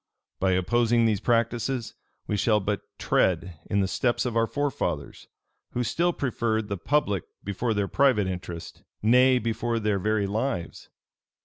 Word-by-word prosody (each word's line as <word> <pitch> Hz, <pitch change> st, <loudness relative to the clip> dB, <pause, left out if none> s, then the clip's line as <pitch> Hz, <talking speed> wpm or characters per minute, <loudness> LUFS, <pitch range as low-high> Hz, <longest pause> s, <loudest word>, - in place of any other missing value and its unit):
By 95 Hz, 0 st, +2 dB
opposing 115 Hz, +5 st, +2 dB
these 110 Hz, -3 st, +2 dB
practices, 115 Hz, +1 st, 0 dB, 0.3 s
we 105 Hz, -, -1 dB
shall 105 Hz, +1 st, +3 dB
but 105 Hz, 0 st, -2 dB, 0.2 s
tread 85 Hz, -2 st, +1 dB
in 100 Hz, -, +2 dB
the 95 Hz, -, +1 dB
steps 120 Hz, +6 st, 0 dB
of 120 Hz, -2 st, -2 dB
our 115 Hz, 0 st, +3 dB
forefathers, 145 Hz, +2 st, -3 dB, 0.5 s
who 125 Hz, -, 0 dB
still 170 Hz, +10 st, +1 dB
preferred 115 Hz, -7 st, -1 dB
the 100 Hz, -, -2 dB
public 100 Hz, -, 0 dB, 0.2 s
before 110 Hz, +4 st, -1 dB
their 100 Hz, -1 st, 0 dB
private 130 Hz, -6 st, +3 dB
interest, 90 Hz, -2 st, -6 dB, 0.2 s
nay, 125 Hz, +3 st, +5 dB
before 115 Hz, 0 st, -1 dB
their 105 Hz, -2 st, 0 dB
very 105 Hz, +1 st, +1 dB
lives. 100 Hz, -3 st, -3 dB
110 Hz, 145 wpm, -26 LUFS, 100-120 Hz, 0.5 s, nay